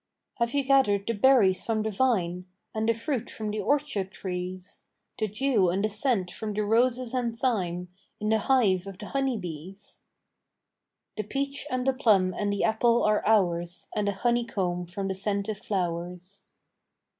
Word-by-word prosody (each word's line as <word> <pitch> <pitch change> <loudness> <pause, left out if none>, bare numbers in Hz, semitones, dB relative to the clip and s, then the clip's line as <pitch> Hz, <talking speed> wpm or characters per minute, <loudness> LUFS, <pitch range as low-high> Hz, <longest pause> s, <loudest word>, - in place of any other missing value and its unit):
"Have 235 +3 0
you 280 - +2
gathered 260 -8 +3
the 230 - 0
berries 210 -4 +4
from 220 -2 0
the 220 - -1
vine, 185 -6 0 0.3
And 220 +1 0
the - - +5
fruit 245 +1 -3
from 215 -1 -4
the 215 - -3
orchard 245 -5 0
trees? 185 -1 -6 0.4
The 215 - +1
dew 210 -3 +2
and 195 +4 0
the - - 0
scent 210 -4 0
from 210 +1 -5
the 210 - 0
roses 245 +3 +2
and 240 -3 -1
thyme, 180 -8 -1 0.3
In 215 - -1
the 220 0 +3
hive 200 -7 +2
of 195 -2 -8
the - - -8
honeybees?" 195 - -4 1.2
"The 215 - -1
peach 275 +6 -3
and 255 -1 -1
the 265 - +3
plum 205 -8 +3
and 205 +2 -1
the 200 - -1
apple 230 +2 +3
are 210 0 +2
ours, 175 -5 +1
And 210 -1 0
the 200 - +1
honeycomb 195 -6 -1
from 195 +3 -4
the 190 - -1
scented 200 +1 -2
flowers." 180 0 -4
210 Hz, 170 wpm, -27 LUFS, 185-235 Hz, 1.2 s, the